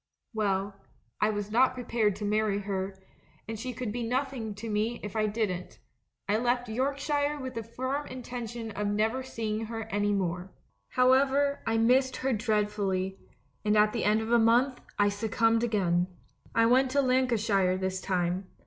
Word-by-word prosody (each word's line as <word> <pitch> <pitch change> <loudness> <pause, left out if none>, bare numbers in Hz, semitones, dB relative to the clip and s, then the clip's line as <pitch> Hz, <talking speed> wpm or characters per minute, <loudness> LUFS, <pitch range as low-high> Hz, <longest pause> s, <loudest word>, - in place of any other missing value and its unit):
Well, 200 -2 0 0.5
I 210 - +3
was 205 -1 -3
not 255 +3 +4
prepared 230 -5 0
to 210 - -5
marry 210 -1 +1
her, 195 -1 -3 0.5
and 225 -1 -5
she 255 +3 -4
could 245 -2 -4
be 240 +3 -3
nothing 245 -2 -2
to 215 +3 -7
me 220 +2 -1
if 205 +1 -6
I 215 -1 +2
didn't; 205 -4 -2 0.5
I 205 +1 +2
left 245 +1 0
York 260 +5 -1
shire 290 +1 0
with 260 -1 -5
the 230 - -3
firm 260 +6 -3
intention 240 -2 -6
of 210 0 -2
never 220 +5 +1
seeing 225 -4 -3
her 225 0 -4
any 205 0 +1
more. 180 -2 -1 0.4
"However, 270 +2 +3
I 225 0 +2
missed 255 +3 +3
her 265 0 0
dreadfully, 205 -4 0 0.4
and 210 0 +3
at 210 0 +4
the 235 - -1
end 215 +1 +3
of 220 +1 -4
a 235 - +6
month, 245 +4 +3 0.2
I 205 0 +4
succumbed 225 +2 +1
again. 180 -6 +1 0.5
I 230 - +5
went 255 +3 +4
to 280 +2 +2
Lancashire 225 -8 +2
this 190 0 -2
time. 180 0 -1
225 Hz, 170 wpm, -29 LUFS, 205-250 Hz, 0.5 s, a